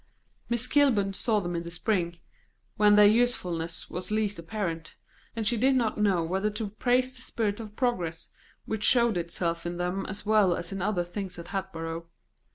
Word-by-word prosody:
Miss 235 0 0
Kilburn 250 -8 +3
saw 215 +2 +1
them 175 -2 -3
in 170 - -1
the 170 - -7
spring, 175 -1 -1 0.6
when 210 0 +5
their 210 0 +8
usefulness 180 -8 +1
was 180 +1 -5
least 210 -3 0
apparent, 170 -3 -4 0.4
and 225 -1 -2
she 235 +2 +2
did 265 +4 +3
not 230 -4 0
know 195 -5 +3
whether 190 +5 0
to 210 0 -4
praise 250 +4 +1
the 255 - -7
spirit 215 -4 -2
of 210 -2 -8
progress 180 -11 -1 0.4
which 220 -1 -3
showed 235 -3 +4
itself 170 -1 -2
in 175 0 -4
them 180 +2 -2
as 195 +3 -6
well 210 -4 +4
as 170 - -5
in 195 -1 -4
other 190 -2 0
things 185 +1 -6
at 170 0 -8
Hatboro'. 165 -4 -4
200 Hz, 180 wpm, -28 LUFS, 175-220 Hz, 0.6 s, their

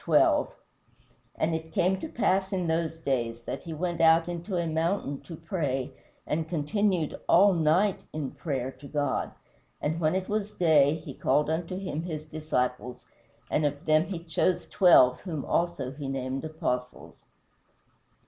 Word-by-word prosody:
12: - - +4 0.8
"And 165 +1 0
it 160 0 -4
came 190 -1 +1
to - - -5
pass 195 -8 +1
in 185 -2 -1
those 165 0 -1
days 120 -6 -2
that - - -5
he 170 - -8
went 170 +1 -2
out 165 +1 +5
into 175 +2 -3
a 170 - 0
mountain 160 -2 -1
to 165 - -9
pray, 155 -6 -2 0.3
and 160 +1 -2
continued 175 +1 0
all 195 +3 +6
night 175 +5 +2
in 150 -3 -4
prayer 135 -5 -3
to 135 +2 -13
God; 145 -2 -1 0.5
and 160 +2 -1
when 155 +1 +1
it 190 0 -1
was 210 0 -1
day, 155 -7 +4
he 155 -3 -8
called 150 +3 +1
unto 170 +3 -2
him 185 -5 -3
his 155 -3 -5
disciples; 125 -6 -3 0.5
and 155 - +2
of 145 +2 -2
them 155 +1 +4
he 180 -4 -6
chose 170 +2 0
twelve, 130 -10 +6
whom 160 -7 -5
also 170 -7 -1
he 140 0 -7
named 135 0 -3
apostles." 125 -6 -4
160 Hz, 160 wpm, -28 LUFS, 145-175 Hz, 0.8 s, all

